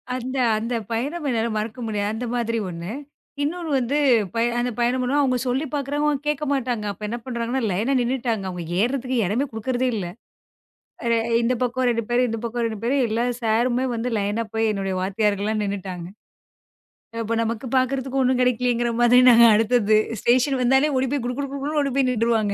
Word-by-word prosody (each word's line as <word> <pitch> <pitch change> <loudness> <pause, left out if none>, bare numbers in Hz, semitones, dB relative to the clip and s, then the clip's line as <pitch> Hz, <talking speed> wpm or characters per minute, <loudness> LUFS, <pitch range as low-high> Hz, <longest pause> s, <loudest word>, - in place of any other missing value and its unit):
அந்த 255 +2 -4 0.2
அந்தப் 230 -2 -3
பயணம் 290 +8 -2
என்னால 230 -1 0
மறக்க 220 +4 -4
முடியாது. 205 -1 -1
அந்த 245 +2 -4
மாதிரி 230 -1 -1
ஒண்ணு. 170 +3 -6 0.5
இன்னொன்னு 335 +2 -3
வந்து, 260 +4 0 0.4
பய 230 +1 +2
அந்தப் 245 -1 -2
பயணம் 245 +2 +1
பண்ணுவோம், 280 +4 +1
அவங்க 255 -2 +1
சொல்லிப் 270 +4 -1
பாக்குறாங்க, 290 +1 -1
அவங்க 290 -1 -2
கேக்க 300 0 -1
மாட்டாங்க. 245 -5 -2
அப்ப 210 +2 -7
என்ன 235 +3 -3
பண்ணுறாங்கனா, 240 +1 -2
லைனா 220 +9 0
நின்னுட்டாங்க. 235 -4 -1
அவங்க 180 -2 -5 0.2
ஏறுறதுக்கு 255 +1 -1
இடமே 230 +10 0
குடுக்கறதே 250 +3 -1
இல்ல 185 -4 -3 1.0
அ - - 0
எ - - +2 0.2
இந்தப் 240 +1 0
பக்கம் 250 +1 0
2 230 -1 0
பேரு, 245 +1 +3
இந்தப் 225 0 -4
பக்கம் 235 0 -2
2 220 -2 -3
பேரு. 255 +4 +1
எல்லா 225 +2 0 0.2
சாருமே 240 +3 +1
வந்து 235 +2 -2
லைனா 205 +3 -1
போய் 225 0 +1
என்னுடைய 195 -2 -2
வாத்தியார்கள்லாம் 205 +2 0
நின்னுட்டாங்க 185 -3 -5 1.1
அப்ப 230 +1 -1
நமக்குக் 230 +3 -3
பாக்குறதுக்கு 265 +1 0
ஒண்ணும் 255 0 +2
கிடைக்கலயேங்கிற 245 -1 +1
மாதிரி, 245 +1 +6
நாங்க 235 0 +8
அடுத்ததது. 220 -1 +3 0.2
ஸ்டேஷன் 255 +2 +2
வந்தாலே 265 +4 +3
ஓடிப் 260 0 0
போய்க் 260 -4 -1
குடு 245 0 -2
குடு 275 - -4
குடுன்னு 290 +2 -2
ஓடிப் 275 -2 -2
போயி 265 -2 +3
நின்றுவாங்க. 225 -3 +1
240 Hz, 180 wpm, -23 LUFS, 220-260 Hz, 1.1 s, நாங்க